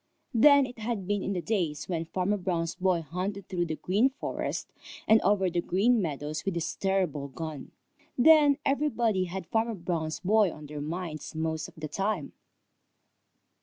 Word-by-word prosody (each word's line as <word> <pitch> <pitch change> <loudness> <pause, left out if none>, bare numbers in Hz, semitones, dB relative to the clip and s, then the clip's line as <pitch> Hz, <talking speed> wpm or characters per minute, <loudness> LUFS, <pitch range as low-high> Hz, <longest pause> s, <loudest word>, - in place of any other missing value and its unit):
Then 280 +4 +7
it 245 -2 -10
had 220 -3 -3
been 205 +1 0
in 200 - -2
the 180 -2 -3
days 165 -7 -1
when 165 -3 -2
Farmer 185 +5 0
Brown's 170 -3 -1
boy 180 -3 +1
hunted 190 +5 -4
through 175 -2 -1
the 155 - -2
Green 205 +11 +2
Forest 270 - -4 0.4
and 220 0 +6
over 195 0 +2
the 175 -1 0
Green 215 +7 +2
Meadows 150 -2 -3
with 195 -3 -2
his 170 - -2
terrible 185 -8 0
gun. 155 0 -7 0.5
Then 295 +1 +6
everybody 240 -9 +1
had 185 +1 -5
Farmer 225 +5 0
Brown's 165 -3 -3
boy 205 -1 +3
on 150 - -10
their 145 0 -6
minds 160 0 -5
most 160 -1 -2
of - - -16
the 155 -1 -5
time. 195 -2 -2
185 Hz, 165 wpm, -28 LUFS, 160-215 Hz, 0.5 s, Then